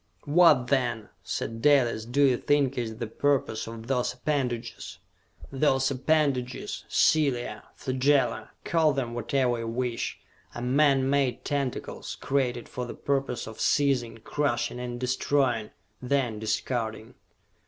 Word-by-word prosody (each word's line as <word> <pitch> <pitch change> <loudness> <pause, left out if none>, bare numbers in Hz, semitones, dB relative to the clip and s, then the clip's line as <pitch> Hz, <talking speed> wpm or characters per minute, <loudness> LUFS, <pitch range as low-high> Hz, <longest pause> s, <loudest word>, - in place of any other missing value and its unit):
"What, 150 -4 +5
then," 120 -6 0
said 115 0 -4
Dalis, 120 -6 +3
"do 130 +5 +2
you 130 -3 +5
think 140 -1 +1
is 115 -3 -3
the 115 - -3
purpose 130 -2 0
of 115 0 -8
those 125 -1 0
appendages?" 125 -4 -3 0.5
"Those 135 -1 +2
appendages, 135 -2 0
cilia, 125 -8 +2
flagella, 135 +2 +1
call 160 -2 +2
them 125 -4 -2
whatever 120 +1 0
you 115 - -4
wish, 120 0 -2 0.4
are - - -5
man 135 +1 +3
made 135 -3 0
tentacles, 140 -3 -3
created 125 -3 -1
for 125 -1 -5
the - - -7
purpose 135 -3 -1
of 110 - -8
seizing, 135 -5 +1
crushing 125 -4 -1
and 120 -1 -5
destroying 125 -3 +1 0.3
then 125 -4 0
discarding...." 110 0 -2
125 Hz, 125 wpm, -27 LUFS, 120-140 Hz, 0.5 s, What